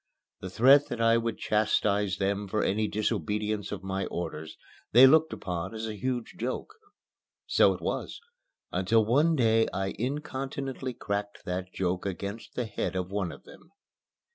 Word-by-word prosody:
The 95 - -6
threat 135 +9 +6
that 120 - -5
I 115 0 +4
would 115 -1 -2
chastise 105 -2 +1
them 100 +1 -1
for 105 +3 0
any 105 +2 +1
disobedience 105 0 -2
of 95 -3 -5
my 95 0 -2
orders 80 -2 -5 0.4
they 125 +4 +10
looked 160 +4 +5
upon 90 +3 -4
as 110 0 -4
a 110 - -4
huge 120 +2 -3
joke. 130 - -3 0.7
So - - +4
it - - -11
was, - - -3 0.5
until 105 +5 +2
one 150 +9 +3
day 115 -4 +3
I 95 0 -2
incontinently 135 -1 -4
cracked 100 -2 -4
that 90 +1 -4
joke 90 0 -2
against 100 +4 -6
the 125 - -1
head 105 -3 -3
of 90 0 -3
one 100 -4 -1
of - - -12
them. 165 - -16
105 Hz, 160 wpm, -28 LUFS, 95-120 Hz, 0.7 s, they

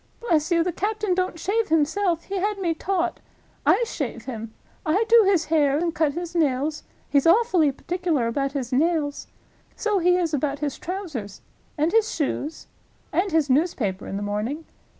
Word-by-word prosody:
Bless 325 -10 +1
you, 335 -2 +3
the 360 - -1
captain 415 +2 -1
don't 365 -2 -1
shave 425 +6 0
himself! 330 +3 +1
He 390 - -4
had 415 +2 0
me 350 -4 0
taught. 350 +1 -1 0.5
I - - +5
shave - - -5
him. 225 -3 -6 0.3
I 380 +6 +2
do 460 -2 +7
his 360 -5 +3
hair, 290 -3 +2
and 335 +1 0
cut 310 -3 +1
his 345 +1 -5
nails—he's 290 -1 0
awfully 355 -6 +4
particular 335 -3 -1
about 275 +4 -1
his 260 -3 -3
nails. 300 0 0 0.5
So 425 -3 0
he 360 +1 +4
is 335 -3 -1
about 285 0 0
his 290 -1 -3
trousers. 310 - -5 0.4
And 310 +3 +2
his 450 +1 +3
shoes. 300 0 -3 0.5
And 360 +5 +1
his 320 -2 +2
newspaper 255 - 0
in 195 - -4
the 205 - -3
morning. 215 +10 -3
325 Hz, 170 wpm, -24 LUFS, 285-365 Hz, 0.5 s, do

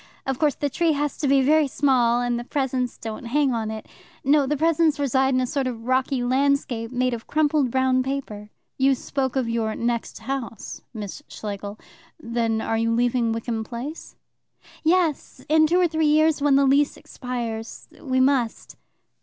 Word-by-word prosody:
Of 270 -1 -2
course, 300 -3 +2
the 290 - -1
tree 325 +3 +1
has 290 -1 -1
to 290 - -1
be 270 0 +4
very 305 +2 +4
small, 245 -4 +2
and 245 -1 -1
the - - -5
presents 260 -2 -2
don't 225 +1 -7
hang 275 +2 +1
on 225 -2 -2
it. 220 0 -6 0.4
No; 280 0 +3
the 295 +2 0
presents 320 0 +2
reside 265 -1 +2
in - - +3
a 255 - +1
sort 270 +1 -1
of 230 -2 -6
rocky 255 0 +1
landscape 260 -2 0
made 255 0 0
of 230 -1 -6
crumpled 300 -3 +2
brown 260 +1 +2
paper." 255 -6 -5 0.3
"You 270 0 +4
spoke 265 0 -3
of 260 -3 0
your 225 -2 -1
'next 235 0 -2
house,' 230 -2 -5
Miss 210 +3 -7
Schlegel. 205 0 -6 0.4
Then 230 -4 -1
are 225 0 -1
you 230 0 +1
leaving 240 0 +1
Wickham 225 0 -3
Place?" 250 +8 -7 0.7
"Yes, 325 -2 0
in 315 +1 +4
two 350 +3 +2
or 360 - +4
three 315 -1 0
years, 310 0 +3
when 285 -1 +4
the 275 0 +4
lease 280 +2 +3
expires. 235 -3 -6
We 260 -2 0
must." 260 -3 +1
260 Hz, 180 wpm, -24 LUFS, 235-285 Hz, 0.7 s, be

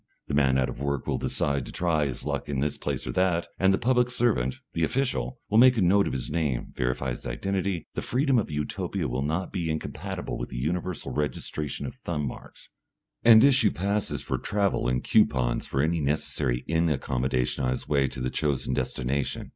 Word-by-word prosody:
The - - -5
man 65 -2 +3
out 65 -1 +2
of - - -7
work 70 -2 -1
will - - -1
decide 70 -2 0
to - - -7
try 80 -4 +1
his 65 - -5
luck - - -3
in 70 -2 -1
this 75 +1 0
place - - -3
or - - -2
that, 85 +3 +1
and 95 +1 +4
the 95 - +3
public 125 0 +2
servant, 115 - +1 0.2
the 85 - 0
official, 120 - -1
will 110 - +4
make 125 0 +7
a - - +2
note 100 +3 +4
of - - -3
his 65 - -3
name, 75 -7 -1
verify 60 +1 -1
his - - -6
identity 95 +6 -2
the - - -3
freedom 135 0 +2
of 105 - -2
Utopia 75 -1 -2
will 65 +2 -2
not 80 +6 -2
be 85 -4 -2
incompatible 80 0 -4
with - - -4
the - - -7
universal 85 +6 -2
registration 75 0 -2
of - - -5
thumb 75 -4 -3
marks 65 - -9 0.5
and 115 -1 +8
issue 130 -6 +5
passes 100 +3 -2
for - - -2
travel 100 -9 0
and 60 0 0
coupons - - +2
for 70 0 0
any 80 +1 +1
necessary 65 -4 -1
inn 80 +1 +2
accommodation 65 -2 -1
on 65 - +1
his 65 - -2
way 70 -2 +2
to 65 - -7
the 65 0 -1
chosen 70 -4 0
destination. 65 +2 -2
75 Hz, 205 wpm, -27 LUFS, 65-95 Hz, 0.5 s, and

